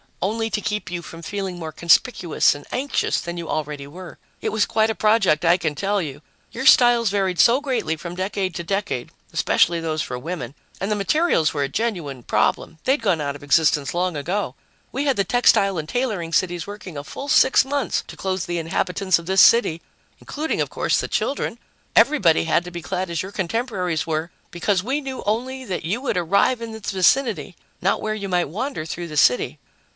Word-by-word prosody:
"Only 225 +3 -1
to 210 - -1
keep 210 -2 -3
you 175 0 -4
from 165 0 -10
feeling 195 0 -4
more 160 -2 -5
conspicuous 170 +2 +3
and 145 - -11
anxious 275 +3 0
than 175 0 -6
you 170 -1 -5
already 150 -2 -3
were. 175 +5 -10 0.2
It - - -2
was 215 0 +2
quite 220 -1 +2
a 220 - -1
project, 195 -8 +3
I 170 +2 +5
can 160 -4 -2
tell 200 +5 0
you 145 -3 -6 0.3
your 255 +3 -5
styles 240 -4 +6
varied 190 -3 0
so 240 +3 +6
greatly 255 - -1
from 170 +2 -8
decade 190 0 -2
to 170 - -4
decade, 195 -9 -2 0.2
especially 170 0 +2
those 160 -1 -2
for 125 - -4
women 140 -4 -5 0.3
and 195 +3 -2
the - - +2
materials 205 - +2
were 145 -2 0
a 135 - -2
genuine 165 - -3
problem; 160 - 0
they'd 265 0 +2
gone 185 -8 +1
out 140 -1 -2
of 145 - -11
existence 145 -1 +2
long 180 -1 0
ago. 175 +8 -2 0.4
We 280 - -2
had 275 -5 +1
the 200 - +3
textile 195 -3 +3
and 155 0 -4
tailoring 215 -10 -2
cities 175 -1 0
working 200 -6 -8
a 145 - -5
full 275 - -7
six 265 -1 +5
months 280 0 -1
to - - -10
clothe 190 -2 -2
the 175 -1 -2
inhabitants 180 +3 0
of 170 - -11
this 190 +1 +5
city, 200 -8 +5 0.4
including, 310 +2 -3
of - - -2
course, - - +1
the - - -2
children. 255 -4 -2 0.4
Everybody 215 - +4
had 165 +1 +2
to 180 - -7
be 175 0 -6
clad 185 +2 -3
as 165 - -1
your 190 - -7
contemporaries 190 - -2
were, 160 +1 -2 0.2
because 180 +2 0
we 270 +6 -1
knew 265 -2 -6
only 255 +5 -1
that 185 -7 -4
you 195 +9 -1
would 265 -8 -1
arrive 200 +8 +2
in 230 -1 -5
this 220 -1 -6
vicinity, 195 - +2 0.3
not 190 - +1
where 215 0 -2
you 200 -2 -5
might 175 -4 +1
wander 225 - -4
through 170 +2 -5
the 155 -2 -6
city." 125 +2 +3
185 Hz, 205 wpm, -22 LUFS, 165-220 Hz, 0.4 s, styles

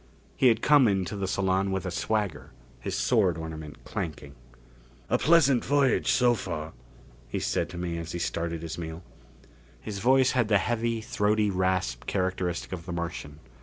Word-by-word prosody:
He 130 - +4
had 115 -2 +3
come 145 -4 +6
into 95 -1 0
the 100 -1 -2
salon 95 0 +1
with 95 0 -2
a 95 - -2
swagger, 95 -8 -2 0.3
his - - -4
sword 85 - +2
ornament 80 -2 -8
clanking. 75 -3 -5 0.8
"A - - +3
pleasant 145 -6 +4
voyage 140 -1 +2
so 125 -1 +4
far," 80 -8 -5 0.5
he - - -4
said - - -1
to 90 - -8
me 85 -1 -3
as 85 0 -6
he - - -3
started 85 -1 -3
his 80 +1 -5
meal. 80 +1 -6 0.8
His 105 -2 -6
voice 130 +3 +4
had 120 -4 +1
the 105 -1 +4
heavy, 115 +2 -1
throaty 105 -1 +1
rasp 90 -11 -1
characteristic 90 -2 -2
of 90 -2 -6
the - - -4
Martian. 85 -3 -5
95 Hz, 165 wpm, -27 LUFS, 85-110 Hz, 0.8 s, come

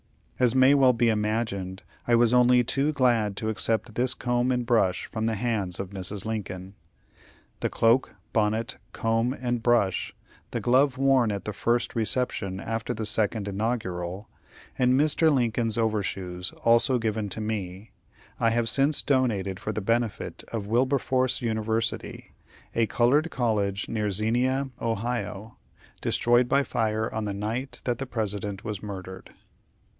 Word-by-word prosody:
As 125 -1 +3
may 130 +1 +6
well 135 -3 +5
be 115 0 +2
imagined, 105 -3 -2 0.2
I 120 - +4
was 120 0 +4
only 125 0 +5
too 140 +5 +1
glad 120 -8 +1
to 110 - -2
accept 110 +1 0
this 125 +3 0
comb 125 +1 0
and 125 -1 0
brush 115 -6 +2
from 110 0 -3
the 115 - 0
hands 100 -5 -1
of 95 -1 -5
Mrs. 100 +1 -3
Lincoln. 95 -4 -5 0.9
The - - -1
cloak, 115 +2 +2 0.2
bonnet, 110 +1 0
comb, 115 +2 0
and 120 -2 -1
brush, 115 -5 +1 0.3
the - - -3
glove 130 +2 +3
worn 135 -4 +3
at 100 -2 -4
the 105 - -3
first 120 +3 0
reception 110 -4 -1
after 115 +2 -3
the 110 0 -3
second 105 -1 0
inaugural, 100 -3 -3 0.5
and 130 +1 +4
Mr. 155 +2 +4
Lincoln's 120 -4 0
over 110 -2 +1
shoes, 90 -2 -4
also 115 +3 +4
given 110 -2 -2
to 95 - -3
me, 105 -2 -4 0.5
I 115 - +3
have 115 0 0
since 140 +4 +1
donated 105 -9 0
for 105 - -3
the 105 0 -3
benefit 115 +1 -1
of 110 -3 -3
Wilberforce 130 +2 +1
University, 110 0 -2 0.4
a 115 -1 +2
colored 140 +9 +2
college 105 -6 -1
near 105 -2 -1
Xenia, 125 +7 0
Ohio, 115 -1 -3 0.4
destroyed 120 +1 +2
by 140 - +3
fire 110 -3 -1
on 110 -1 -2
the 100 - -2
night 115 +6 -4
that 120 0 -1
the 135 - -4
President 105 -4 -3
was 105 -3 -5
murdered. 95 -2 -8
115 Hz, 150 wpm, -26 LUFS, 105-125 Hz, 0.9 s, may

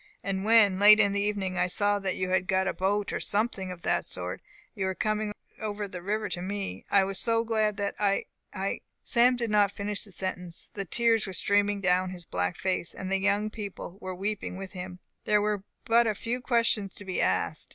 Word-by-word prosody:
And 190 0 -2
when, 210 -3 +5
late 210 +1 +8
in 200 -2 +4
the 200 0 0
evening, 195 -3 -1
I 180 - +3
saw 205 +2 +2
that 195 -1 -2
you 185 0 -2
had 185 0 +1
got 190 -1 +2
a - - 0
boat, 200 +2 0
or - - -1
something 200 -3 -1
of 175 -2 -9
that - - +1
sort, - - -4 0.3
and 195 - -2
were 190 0 -1
coming 215 +2 -1 0.3
over 210 -1 -3
the 180 -2 -7
river 210 +3 -1
to 175 0 -3
me, 190 - -4
I 200 - +5
was 195 0 -2
so 230 -1 +2
glad 215 -2 0
that 200 -1 -1
I 200 -1 +1 0.3
I 195 0 -3
" - - -53
Sam 250 +1 +6
did 235 -3 -2
not 205 -2 +4
finish 205 0 -3
the 200 - -8
sentence. 180 -2 -4
The 200 -1 -4
tears 230 +1 +2
were 190 - -5
streaming 205 +1 +1
down 185 0 +2
his 180 -2 -8
black 90 -6 -2
face, 185 -2 -1
and 190 0 -5
the 195 - +2
young 205 +2 +1
people 200 -3 -7
were 185 0 -5
weeping 200 0 -3
with 190 -1 -6
him. 180 -1 -7 0.3
There 210 0 +4
were 205 -1 -1 0.2
but 230 -1 +4
few 245 +2 -3
questions 230 -5 +1
to 205 - -7
be 185 -1 -1
asked. 85 -3 0
200 Hz, 220 wpm, -28 LUFS, 185-210 Hz, 0.3 s, late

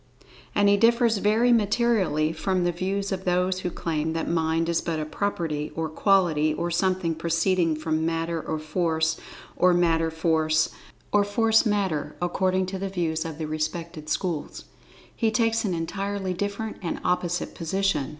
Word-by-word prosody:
"[Pg - - -30 0.2
27] - - 0
And 200 - +5
he 200 - +5
differs 230 +1 +4
very 220 +4 +3
materially 210 -8 +2
from 185 +3 0
the 175 - +2
views 195 +3 -2
of 190 -1 -3
those 180 +1 +1
who 180 - -2
claim 160 -2 -2
that 165 - -2
Mind 165 0 +1
is 170 0 +1
but 165 -2 -2
a 155 - -2
property, 155 -3 -2
or 160 -1 -2
quality, 160 -4 +2
or 170 +2 -2
something 185 -1 +1
proceeding 165 +1 +1
from 155 0 -1
Matter 165 0 -1
or 160 - -3
Force, 160 0 0 0.4
or 180 -1 +4
Matter 165 -2 +2
Force, 160 -1 +1 0.4
or 205 0 +4
Force 225 +3 +3
Matter—according 185 -1 0
to 190 +1 -5
the 195 0 -3
views 165 -3 -1
of 160 -2 -6
the 160 - -3
respective 155 +1 -4
schools. 170 -6 -3 0.5
He 225 - +1
takes 225 +1 +1
an 185 -4 0
entirely 195 +3 -3
different 205 +4 -4
and 170 - -3
opposite 180 -1 -1
position. 165 -4 -1
175 Hz, 165 wpm, -25 LUFS, 160-195 Hz, 0.5 s, And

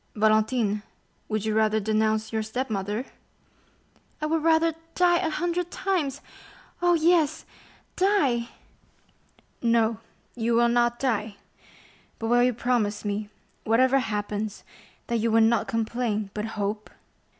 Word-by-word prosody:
"Valentine, 215 0 +2 0.5
would 215 -1 -1
you 215 - 0
rather 220 0 +2
denounce 220 +1 0
your 220 - 0
stepmother?" 220 -1 -3 1.1
"I 305 - -2
would 320 +1 0
rather 325 +1 +3 0.2
die 350 -1 +4
a 340 - 0
hundred 350 +2 -2
times—oh, 350 0 -2
yes, 330 -2 +2 0.5
die!" 285 - +2 1.1
"No, 230 -2 +2 0.3
you 230 -1 0
will 235 0 +4
not 240 0 +2
die; 220 -5 -1 0.8
but 225 - -3
will 240 0 +4
you 250 +1 +4
promise 230 -4 -1
me, 205 0 -3 0.3
whatever 255 +4 +3
happens, 210 -2 -3 0.4
that 235 - -1
you 230 +1 +1
will 225 0 +4
not 225 +1 +3
complain, 225 -2 -2
but 210 0 -3
hope?" 210 +1 -3
230 Hz, 120 wpm, -26 LUFS, 215-270 Hz, 1.1 s, die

